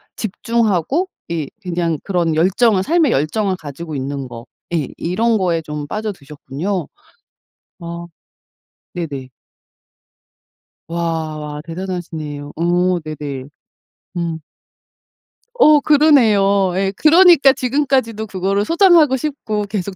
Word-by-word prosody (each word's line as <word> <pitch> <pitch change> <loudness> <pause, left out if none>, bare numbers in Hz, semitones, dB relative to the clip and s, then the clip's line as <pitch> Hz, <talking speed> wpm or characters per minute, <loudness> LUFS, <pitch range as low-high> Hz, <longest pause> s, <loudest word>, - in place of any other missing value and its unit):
집중하고 230 - 0 0.2
이 165 -4 -3
그냥 170 -4 -2
그런 175 -5 0
열정을 190 +4 +3
삶의 320 - +2
열정을 185 +8 0
가지고 155 0 -8
있는 135 0 -4
거. 115 -1 -9 0.3
예 155 -6 0
이런 220 +6 +1
거에 175 -4 0
좀 150 -2 -6
빠져드셨군요. 175 -3 -4 0.9
어 170 0 -7 0.9
네네. 145 -7 -5 1.6
와 160 -3 -3
대단하시네요. 165 -5 -6
어 175 +2 +1
네네. 145 -4 -6 0.7
음. 170 -2 -2 1.2
어 305 -11 +6
그러네요. 220 - +4
예. 195 +1 0
그러니까 325 -4 +6
지금까지도 255 -4 0
그거를 195 +1 -1
소장하고 335 - +5
싶고 255 -7 -3
계속 195 -1 -4
185 Hz, 225 characters per minute, -18 LUFS, 160-230 Hz, 1.6 s, 어